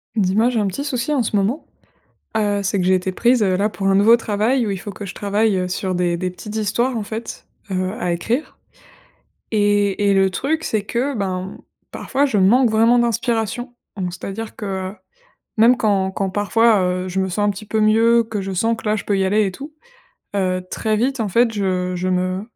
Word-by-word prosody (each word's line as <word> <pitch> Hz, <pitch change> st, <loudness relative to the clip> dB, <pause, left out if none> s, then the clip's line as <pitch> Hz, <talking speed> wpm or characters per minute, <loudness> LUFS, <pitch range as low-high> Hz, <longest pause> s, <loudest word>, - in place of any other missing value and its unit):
Dis-moi, 210 Hz, +3 st, +2 dB
j'ai 235 Hz, -3 st, 0 dB
un 205 Hz, -, +1 dB
petit 195 Hz, +9 st, -4 dB
souci 260 Hz, -1 st, -2 dB
en 275 Hz, -5 st, +2 dB
ce 215 Hz, -, -2 dB
moment, 205 Hz, +9 st, 0 dB, 0.7 s
heu, 205 Hz, -2 st, +1 dB
c'est 195 Hz, 0 st, 0 dB
que 180 Hz, -, 0 dB
j'ai 190 Hz, -, +4 dB
été 185 Hz, 0 st, -1 dB
prise, 240 Hz, +4 st, +2 dB
heu, 185 Hz, -2 st, +2 dB
là, 205 Hz, +2 st, +1 dB
pour 195 Hz, -2 st, -2 dB
un 195 Hz, -, +3 dB
nouveau 215 Hz, +4 st, +6 dB
travail, 225 Hz, +3 st, 0 dB
où -, -, -2 dB
il 195 Hz, -, -2 dB
faut 205 Hz, +3 st, -7 dB
que 205 Hz, +1 st, -8 dB
je 190 Hz, -, -7 dB
travaille, 205 Hz, +1 st, +1 dB
heu, 180 Hz, 0 st, -2 dB
sur 185 Hz, 0 st, -2 dB
des 175 Hz, -1 st, 0 dB
des 180 Hz, +1 st, -2 dB
petites 210 Hz, +4 st, -8 dB
histoires, 235 Hz, +4 st, 0 dB
en 220 Hz, -, -2 dB
fait, 220 Hz, +2 st, -7 dB, 0.2 s
heu, 185 Hz, 0 st, -1 dB
à 180 Hz, -4 st, 0 dB
écrire. 230 Hz, -, -3 dB, 0.9 s
Et 205 Hz, -1 st, +2 dB
et -, -, +4 dB
le 195 Hz, 0 st, +3 dB
truc, 310 Hz, +11 st, -2 dB
c'est 215 Hz, -8 st, -1 dB
que, 250 Hz, +6 st, -2 dB
ben, 185 Hz, -3 st, -2 dB
mmh, 190 Hz, -, -9 dB, 0.3 s
parfois, 280 Hz, +2 st, 0 dB
je 225 Hz, -, 0 dB
manque 230 Hz, +6 st, +4 dB
vraiment 225 Hz, +2 st, +4 dB
d'inspiration. 235 Hz, +1 st, -1 dB, 0.2 s
Mmh, 185 Hz, -2 st, -2 dB
c'est-à-dire 195 Hz, +5 st, -6 dB
que, 190 Hz, -2 st, -4 dB, 0.6 s
même 235 Hz, +3 st, +5 dB
quand 195 Hz, -5 st, +1 dB
quand 195 Hz, 0 st, -2 dB
parfois, 210 Hz, +2 st, +3 dB
heu, 180 Hz, 0 st, -1 dB
je 185 Hz, +1 st, -2 dB
me 190 Hz, -, -1 dB
sens 205 Hz, +3 st, 0 dB
un -, -, +2 dB
petit 205 Hz, +2 st, -9 dB
peu 220 Hz, +1 st, -1 dB
mieux, 225 Hz, +2 st, +4 dB
que 215 Hz, -2 st, -4 dB
je 195 Hz, 0 st, -4 dB
sens 225 Hz, +5 st, +1 dB
que, -, -, -12 dB
là, 210 Hz, +1 st, +1 dB
je -, -, -6 dB
peux 200 Hz, -, +1 dB
y 195 Hz, -, +1 dB
aller 210 Hz, +2 st, +2 dB
et 195 Hz, -, -2 dB
tout, 285 Hz, +9 st, -9 dB, 0.6 s
heu, 185 Hz, -2 st, 0 dB
très 215 Hz, -1 st, 0 dB
vite, 260 Hz, +4 st, 0 dB
en 215 Hz, -, 0 dB
fait, 230 Hz, +4 st, +2 dB
je 185 Hz, -3 st, -1 dB
je 180 Hz, +1 st, -2 dB
me 185 Hz, +1 st, -1 dB
205 Hz, 225 wpm, -20 LUFS, 190-230 Hz, 0.9 s, nouveau